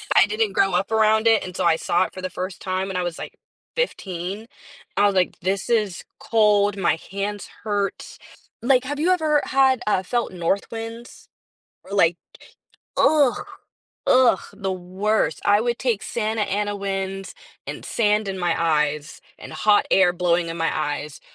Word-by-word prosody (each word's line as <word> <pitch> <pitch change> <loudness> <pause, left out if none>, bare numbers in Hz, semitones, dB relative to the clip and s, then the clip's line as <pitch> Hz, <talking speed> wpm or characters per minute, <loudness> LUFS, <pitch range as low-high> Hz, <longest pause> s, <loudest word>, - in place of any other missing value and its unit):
I 180 - +7
didn't 215 -1 -1
grow 195 -1 +2
up 190 +4 0
around 220 0 +3
it 225 -1 +4
until 180 0 -3
I 165 - +5
saw 170 +2 +1
it - - -10
for 185 - -8
the 185 - -3
first 185 +1 -6
time 185 0 -2
when 190 - -3
I 180 - 0
was, 175 -2 -4
like, - - -7 0.4
15. 195 - -3 0.5
I 205 - +5
was 200 -1 +2
like, 180 -1 +1
"This 195 +4 -2
is 210 -6 0 0.2
cold, 205 -2 +3
my 175 -3 +1
hands 200 +1 -4 0.2
hurt." 205 -2 -3 0.4
Like, 255 +1 +3
have 290 +2 -4
you 345 +4 +2
ever 310 -5 +2
had 265 -2 +3
uh, 190 -2 +2
felt 240 +3 -1
north 180 +5 -1
winds? 230 +1 -8 0.6
Or, 195 - -12
like 170 -2 +4 0.8
Ugh 290 -5 +3 0.6
ugh, 255 -6 +5
the 195 -2 -3
worst. 185 +4 -1
I 205 +1 +5
would 240 0 -1
take 235 -5 0
Santa 220 -1 -2
Ana 205 +1 -1
winds, 195 -1 -4 0.3
and - - -6
sand 210 -2 +1
in 190 -1 -4
my 175 -1 +1
eyes, 150 -2 0 0.2
and - - -10
hot 210 -1 +3
air 190 -2 +5
blowing 175 -1 +1
in 165 - -4
my 165 0 0
eyes, 150 -1 -3
200 Hz, 170 wpm, -23 LUFS, 180-225 Hz, 0.8 s, I